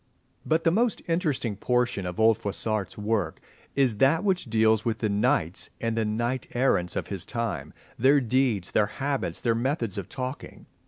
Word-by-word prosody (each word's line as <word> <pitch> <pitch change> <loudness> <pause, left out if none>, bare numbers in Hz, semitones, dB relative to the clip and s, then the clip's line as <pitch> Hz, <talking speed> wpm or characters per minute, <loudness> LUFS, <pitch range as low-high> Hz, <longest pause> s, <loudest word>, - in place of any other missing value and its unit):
But 160 +1 +2
the 165 - +4
most 230 +5 +1
interesting 155 - 0
portion 120 -3 0
of 90 +2 -6
old 110 0 +5
Froissart's 105 -1 -2
work 105 0 -1 0.4
is 130 -6 +2
that 145 - +4
which 190 -3 +1
deals 110 -2 +3
with 115 -2 -1
the 110 - -1
knights 95 -4 0
and 115 -1 -1
the 115 -1 +1
knight 120 +4 -1
errants 105 -9 +2
of - - -3
his 95 -4 -3
time, 115 +2 -3 0.3
their 135 +4 +5
deeds, 120 -6 +1
their 105 - +3
habits, 140 +5 -2
their 115 - +2
methods 115 - -1
of 95 - -8
talking. 130 +1 -6
115 Hz, 170 wpm, -26 LUFS, 105-135 Hz, 0.4 s, old